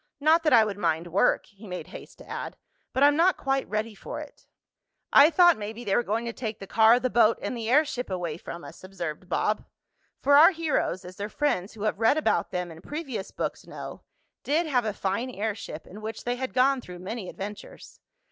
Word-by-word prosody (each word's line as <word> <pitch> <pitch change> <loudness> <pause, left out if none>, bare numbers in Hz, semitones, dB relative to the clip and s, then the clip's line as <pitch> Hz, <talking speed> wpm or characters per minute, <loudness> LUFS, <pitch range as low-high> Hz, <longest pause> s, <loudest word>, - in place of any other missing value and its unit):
Not 315 +3 +4
that 320 - +2
I 230 -3 +7
would 205 -1 -5
mind 165 -2 0
work," 195 - +3
he 205 +1 -15
made 180 -1 -5
haste - - -12
to - - -14
add, - - -6 0.3
"but 265 - +1
I'm 290 0 +6
not 350 +4 +4
quite 270 0 -1
ready 215 +1 -2
for 200 - -7
it." - - -12 0.7
"I 290 +2 +9
thought 345 -3 +5
maybe 215 +3 -6
they 195 -4 0
were - - +4
going 230 +1 -2
to 235 - -4
take 220 -3 -5
the 195 - -9
car, 220 +4 +5
the 255 -1 -1
boat 230 -1 +4
and - - -4
the 230 -1 -4
airship 265 -3 +2
away 175 -4 -3
from 170 0 -8
us," - - -12
observed 185 -2 -6
Bob, 210 +3 0 0.6
for 285 +1 +5
our 315 +3 +9
heroes, 305 - -1
as 180 +1 -10
their 205 +1 -4
friends 215 -9 -1
who 215 -2 -8
have 215 -1 -1
read 230 +6 +4
about 310 - +1
them 180 -2 -3
in 165 0 -12
previous 270 - -5
books - - -5
know, - - -8 0.4
did 315 +4 +1
have 255 -6 +1
a 215 - -1
fine 200 +6 -2
airship, 205 -8 -5
in 205 +4 -11
which 220 0 -6
they 245 0 -1
had 260 +1 -5
gone 260 +1 +3
through 180 -5 -10
many 190 +2 -6
adventures. 205 +1 -9
220 Hz, 215 wpm, -27 LUFS, 195-270 Hz, 0.7 s, I